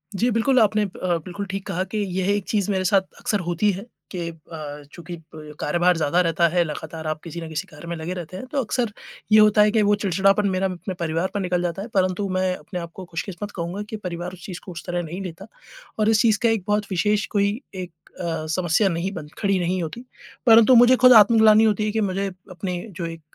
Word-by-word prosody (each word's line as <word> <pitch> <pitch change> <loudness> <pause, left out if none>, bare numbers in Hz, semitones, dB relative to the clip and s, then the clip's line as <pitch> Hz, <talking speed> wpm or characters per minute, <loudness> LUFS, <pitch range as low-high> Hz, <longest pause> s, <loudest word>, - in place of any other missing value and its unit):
जी, 235 +6 +2
बिल्कुल 240 +4 +3
आपने 215 -1 +3
अ, 185 -3 -2
बिल्कुल 195 +3 -5
ठीक 195 0 -5
कहा 185 -2 -1
कि 195 +3 -5 0.2
यह 190 +1 0
एक 205 - -2
चीज़ 205 -2 0
मेरे 190 -1 0
साथ 195 +1 +4 0.2
अक्सर 205 - 0
होती 175 +4 +2
है 195 +1 -6 0.3
कि 175 -3 -4
अ, 155 -2 -9
चूँकि 170 +1 -8 0.2
ब 150 -1 -10
कार्यभार 175 +3 +2
ज़्यादा 165 +3 +2
रहता 170 0 +2
है, 175 +1 +2
लगातार 160 0 -6
आप 155 0 -3
किसी 170 0 -7
न 165 - -6
किसी 160 0 -4
कार्य 155 +2 -11
में 170 - -3
लगे 165 +2 -4
रहते 180 0 -7
हैं, 225 - -7
तो 275 +1 -1
अक्सर 235 0 -1 0.4
ये 215 - +8
होता 210 0 +6
है 210 0 +5
कि 220 0 +3
वो 205 0 +4
चिड़चिड़ापन 195 +1 +2
मेरा 190 0 0
अपने 185 +1 -5
परिवार 165 +1 -1
पे 205 - -1
निकल 180 -2 0
जाता 175 +1 -2
है। 205 - -6
परंतु 185 +1 +1
मैं 185 0 0
अपने 180 +4 -7
आप 170 -1 -7
को 190 - -8
खुशकिस्मत 180 +4 -6
कहूँगा 175 +3 -4
कि 220 - -4
परिवार 180 -2 -5
उस 185 - -12
चीज़ 180 -3 -6
को 185 - -8
उस 170 - -8
तरह 175 -1 -2
नहीं 170 +4 -6
लेता 185 +1 -8 0.5
और 215 0 +3
इस 220 -1 +4
चीज़ 220 -3 +3
का 230 - +5
एक 225 -4 0
बहुत 210 0 +1
विशेष 210 +3 +1
कोई 200 0 +3 0.2
एक 180 -1 -6 0.3
अ, 165 -2 -3
समस्या 175 +4 +2
नहीं 170 +2 -2
बन 160 -5 -7
खड़ी 200 -2 +1
नहीं 180 +1 -1
होती। 230 +10 -7 0.4
परंतु 230 +1 +7
मुझे 245 +2 +7
खुद 255 0 +7
आत्मग्लानि 220 0 +7
होती 215 -1 +2
है 215 - 0
कि 220 +1 0
मुझे 195 0 -1 0.2
अपनी 180 0 -4 0.2
जो 170 - -3
एक 165 0 -7
185 Hz, 235 wpm, -23 LUFS, 170-210 Hz, 0.5 s, ये